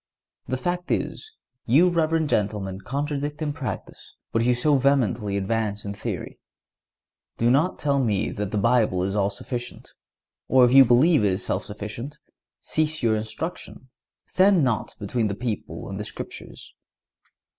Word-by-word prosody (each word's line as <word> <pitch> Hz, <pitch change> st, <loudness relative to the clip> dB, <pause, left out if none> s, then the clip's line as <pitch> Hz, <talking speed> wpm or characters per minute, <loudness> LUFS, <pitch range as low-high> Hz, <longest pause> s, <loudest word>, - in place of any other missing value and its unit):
The 130 Hz, -, -1 dB
fact 175 Hz, +5 st, -3 dB
is, 445 Hz, -, -2 dB, 0.4 s
you 145 Hz, +10 st, +5 dB
reverend 165 Hz, -2 st, +1 dB
gentlemen 100 Hz, -3 st, -1 dB
contradict 145 Hz, +4 st, -3 dB
in 150 Hz, -2 st, -2 dB
practice 125 Hz, -, -7 dB, 0.2 s
what 115 Hz, -, +1 dB
you 125 Hz, +1 st, +3 dB
so 140 Hz, +3 st, +3 dB
vehemently 120 Hz, -7 st, +1 dB
advance 105 Hz, +1 st, -1 dB
in 100 Hz, -, -4 dB
theory. 100 Hz, -, -5 dB, 1.0 s
Do 115 Hz, +1 st, +3 dB
not 155 Hz, +8 st, +2 dB
tell 140 Hz, -2 st, +1 dB
me 105 Hz, -5 st, 0 dB
that 105 Hz, -1 st, -3 dB
the 105 Hz, -, -2 dB
Bible 105 Hz, -4 st, +2 dB
is 95 Hz, +2 st, -1 dB
all 100 Hz, -1 st, +2 dB
sufficient; 120 Hz, +4 st, -6 dB, 0.5 s
or, 130 Hz, -1 st, +6 dB
if 125 Hz, -, +2 dB
you 135 Hz, 0 st, +9 dB
believe 125 Hz, +3 st, +4 dB
it 100 Hz, -2 st, +3 dB
is 95 Hz, -, -3 dB
self -, -, -1 dB
sufficient, 110 Hz, +6 st, -7 dB, 0.4 s
cease 155 Hz, -2 st, -1 dB
your 110 Hz, -2 st, +3 dB
instructions. 110 Hz, +13 st, -5 dB, 0.4 s
Stand 190 Hz, -3 st, +4 dB
not 120 Hz, -5 st, -1 dB
between 110 Hz, +2 st, -1 dB
the 100 Hz, -, -3 dB
people 115 Hz, -2 st, -5 dB
and -, -, -6 dB
the -, -, -3 dB
Scriptures. -, -, -9 dB
120 Hz, 155 wpm, -24 LUFS, 105-145 Hz, 1.0 s, you